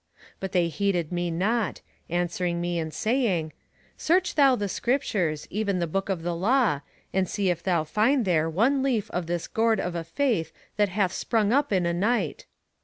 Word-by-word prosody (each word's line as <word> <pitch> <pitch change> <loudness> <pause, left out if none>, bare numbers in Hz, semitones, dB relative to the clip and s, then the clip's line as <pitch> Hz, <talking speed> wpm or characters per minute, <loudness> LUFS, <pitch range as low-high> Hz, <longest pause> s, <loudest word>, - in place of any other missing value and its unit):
But 190 -1 -4
they 175 -2 +2
heeded 175 0 -1
me 175 0 -1
not, 205 +5 0 0.3
answering 175 0 -1
me 175 0 -1
and 160 -1 -3
saying: 205 - 0 0.4
Search 360 +3 +2
thou 275 -3 +5
the 205 -3 -2
Scriptures, 190 - -1
even 200 -1 0
the 175 - 0
Book 195 +5 -2
of 180 -4 -2
the 175 0 -1
Law, 205 - +2 0.3
and 190 -1 +1
see 200 -3 +1
if 170 -1 -3
thou 175 -4 +1
find 220 - +2
there 165 -3 +2
one 240 - +2
leaf 250 -6 0
of 175 -2 -3
this 170 0 -2
gourd 225 -1 +1
of 180 - -2
a 170 -1 -3
faith 180 - 0 0.2
that 205 -1 +2
hath 190 -1 0
sprung 220 -2 +1
up 285 -1 +2
in 185 -3 +2
a 170 - +1
night. 200 -2 -1
190 Hz, 185 wpm, -26 LUFS, 170-225 Hz, 0.4 s, thou